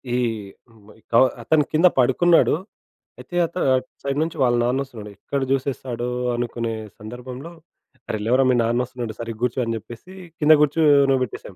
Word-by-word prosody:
ఈ - - +2 0.7
బ్ - - -18 0.2
డౌ 115 - +7 0.2
అతను 155 -2 +3
కింద 165 +4 +6
పడుకున్నాడు. 155 +7 +4 0.6
అయితే 175 - -10
అత 170 - -10 0.2
అటు 130 0 -2 0.2
సైడ్ 140 0 -2
నుంచి 165 0 -5
వాళ్ళ 120 -1 +3
నాన్న 130 +3 0
ఒస్తున్నాడు. 110 -6 -10
ఎక్కడ 140 -1 -3
చూసేస్తాడో 130 -3 -2 0.3
అనుకునే 120 -1 -3 0.3
సందర్భంలో, 125 +8 -8 0.6
"అరె! 110 - -2
లెవరా 130 +4 +3
మీ 125 - +4
నాన్న 120 +2 0
ఒస్తున్నాడు 120 -3 -6
సరిగా 115 -1 -6
గూర్చో!" 125 +1 0
అని 115 0 -2
చెప్పేసి 120 - -12 0.3
కింద 155 +1 +6
కూర్చోన 145 -2 +4
బెట్టేసాం. 105 -5 -8
125 Hz, 155 wpm, -22 LUFS, 120-140 Hz, 0.7 s, డౌ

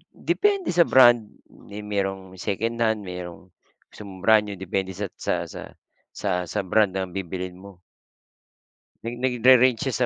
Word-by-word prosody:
depende 400 -3 0
sa 170 -1 +4
brand. 120 -4 +6 0.2
May 105 +1 -11
merong 95 -2 -3
secondhand, 110 +1 -1
merong 90 0 -9 0.4
gusto - - -13
mong 95 0 -11
brand 110 -1 +5
new, 100 - -5
depende 95 0 -3
sa 100 +1 -3
sa - - -1
sa - - -9 0.5
sa - - -3 0.2
sa - - -3
brand 100 0 +2
ng 95 -1 -3
bibilhin 90 0 -6
mo. 95 -2 -14 1.2
Nag 120 +1 -5
nagre-range 125 -1 +4
siya 130 -2 0
105 Hz, 145 wpm, -24 LUFS, 95-120 Hz, 1.2 s, brand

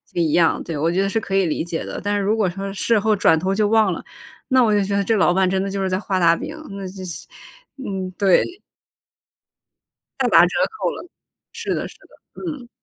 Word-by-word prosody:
一 165 -3 +1
样， 165 +1 +2
对， 165 -3 -5
我 160 +3 +1
觉 185 +2 +1
得 195 - 0
是 225 - 0
可 195 -3 -4
以 195 -1 +3
理 160 - -1
解 170 -1 -4
的。 - - -6
但 205 0 0
是 - - 0
如 210 +3 +2
果 210 -4 +1
说 195 +2 -5
事 220 +3 +2
后 215 +1 +2
转 190 -5 +4
头 185 +4 -1
就 210 +1 +2
忘 220 0 +3
了， - - -7 0.4
那 260 -1 +4
我 220 -2 +3
就 205 -1 +3
觉 200 +1 -2
得 200 - +1
这 225 +3 +1
老 185 -3 +3
板 190 0 +2
真 190 0 0
的 195 - -3
就 195 0 -3
是 190 - 0
在 185 0 0
画 195 -2 -2
大 170 -1 +5
饼， 300 - -6 0.2
那 195 -1 -6
就 185 0 -8
是， 170 - -8 0.5
嗯， 195 -8 -4
对。 205 - +2 1.6
大 - - +2
打 - - +7
折 - - +5 0.2
扣 435 - -2
了。 - - -8 0.5
是 - - -3
的， - - -3
是 - - -15
的， - - -18
嗯。 290 -8 -6
195 Hz, 255 characters per minute, -21 LUFS, 185-215 Hz, 1.6 s, 打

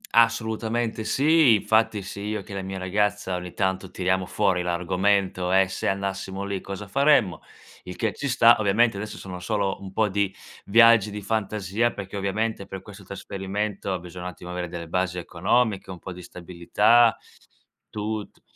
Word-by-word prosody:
Assolutamente, 115 0 +1
sì. 150 -4 +4
Infatti, 110 -1 +1
sia 100 - -8
io 105 -1 -3
che 100 - -10
la 95 - -3
mia 95 0 -5
ragazza, 100 +1 -1
ogni 90 0 -6
tanto 95 -1 -1
tiriamo 95 0 -1
fuori 95 -4 +1
l'argomento: 90 +1 0
"E 95 0 +4
se 95 - -3
andassimo 95 0 -3
lì, 100 -2 -3
cosa 100 +1 -7
faremmo?" 135 -8 +3 0.4
Il 90 - -7
che 110 -3 -1
ci 140 - -4
sta 120 -2 +5
ovviamente, 110 +1 +2
adesso 105 +1 -6
sono 90 -2 -8
solo 100 +1 -1
un 95 -1 -8
po' 110 0 +1
di 100 0 0 0.3
viaggi 115 0 +6
di 105 -1 -7
fantasia, 105 +1 -1
perché, 100 0 -7
ovviamente, 100 +1 -2
per 95 - -8
questo 105 -1 -12
trasferimento, 100 0 -4
bisogna 90 +1 -10
un - - -2
attimo 90 0 -10
avere 90 0 -3
delle 85 -1 -7
basi 90 +1 -1
economiche, 100 +5 0
un 95 - -6
po' 95 +1 -8
di 90 - -10
stabilità, 90 +7 +2 0.7
tut 105 0 -5
100 Hz, 165 wpm, -25 LUFS, 95-110 Hz, 0.7 s, viaggi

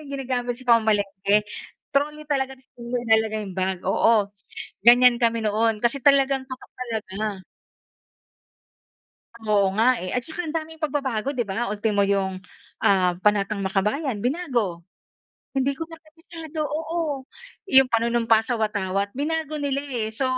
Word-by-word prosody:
'yong 280 -1 -7
ginagamit 245 -2 -2
sa 255 - -15
pamamalengke? 205 -2 +1 0.5
Trolley 300 +2 0
talaga 265 -2 0
tas 260 0 -28
inalalagay 225 -3 0
'yong 190 -2 -9
bag, 185 0 0
oo. 205 +1 +3 0.5
Ganyan 245 +1 +7
kami 230 -1 +2
noon 220 +1 +1
kasi 240 +3 0
talagang 275 -1 +4
tutok 260 -1 -10
talaga. 215 -5 -4 2.0
Oo 200 -2 +3
nga, 245 +2 +4
eh. 185 - -4
At 250 - -1
tsaka 330 +1 -5
ang 310 - -5
daming 320 0 -5
pagbabago, 270 -5 -1
'di 240 - 0
ba? 210 +5 -2
Ultimo 210 0 0
'yong, 195 -2 0 0.4
ah, 185 -2 +3
Panatang 205 0 +1
Makabayan, 210 +7 -1
binago. 245 - -1 0.8
Hindi 270 +1 +1
ko 325 - -4
na 325 - -10
kabisado, 325 -1 -9
oo. 310 -3 -3 0.4
'Yong 265 -6 +6
Panunumpa 230 -1 +3
sa 245 - 0
Watawat, 200 -2 -1
binago 310 +1 -2
nila, 280 -1 -1
eh. 230 -4 -1
So, 265 - -3
240 Hz, 140 wpm, -24 LUFS, 210-275 Hz, 2.0 s, Ganyan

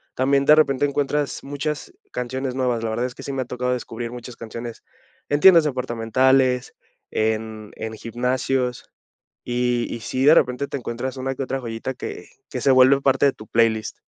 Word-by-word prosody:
también, 140 +1 +2
de 150 +1 +8
repente, 145 -3 +3
encuentras 145 0 -1
muchas 145 +2 -4 0.2
canciones 130 +1 -3
nuevas. 125 -3 0
La 115 - -1
verdad 115 +3 -1
es 125 - -5
que - - -10
sí 140 - -4
me 135 -1 -1
ha - - -15
tocado 125 0 -2
descubrir 120 -1 -5
muchas 125 0 -9
canciones 115 +1 -8 0.5
en 145 - +1
tiendas 175 -3 +8
departamentales, 130 0 +1 0.4
en 110 -1 -2
en 110 0 -5
gimnasios, 125 +2 -1 0.6
y 120 -1 0
y - - -5
sí, 130 +4 -2
de 150 +3 +8
repente, 130 -1 +2
te - - -3
encuentras 125 +2 -4
una 135 +1 -2
que 135 - -4
otra 135 +1 -3
joyita 115 +1 -4
que - - -7 0.2
que - - -4
se 140 - +4
vuelve 130 +1 +6
parte 135 0 +3
de 140 - +4
tu 110 - -13
playlist. 110 -2 +1
125 Hz, 185 wpm, -22 LUFS, 120-135 Hz, 0.6 s, de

